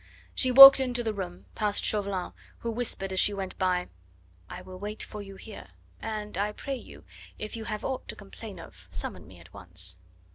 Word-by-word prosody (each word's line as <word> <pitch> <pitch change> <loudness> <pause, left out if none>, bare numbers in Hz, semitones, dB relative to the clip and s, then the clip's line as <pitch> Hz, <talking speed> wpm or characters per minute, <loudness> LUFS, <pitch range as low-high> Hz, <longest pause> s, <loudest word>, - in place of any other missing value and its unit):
She 255 - +3
walked 270 +2 +12
into 250 -2 -1
the 220 -2 -2
room, 180 -3 -7
past 210 -1 -1
Chauvelin, 200 -3 -1 0.3
who 230 - -3
whispered 220 -5 -1
as 190 - +2
she 205 - +4
went 195 -1 -5
by: 180 -1 0 0.6
"I - - -8
will 185 0 -11
wait 210 +2 -5
for 210 - -8
you 195 -1 -10
here. 215 +2 -11 0.3
And, 210 -3 -5
I 210 +1 -1
pray 275 +5 -5
you, - - -13 0.3
if 215 +1 -6
you 225 -1 -6
have 215 -1 -5
aught 265 -1 -4
to - - -5
complain 200 -1 -11
of 90 - -14
summon 90 0 -6
me 90 -1 -15
at 85 +1 -18
once." 90 -2 -5
205 Hz, 195 wpm, -28 LUFS, 180-220 Hz, 0.6 s, walked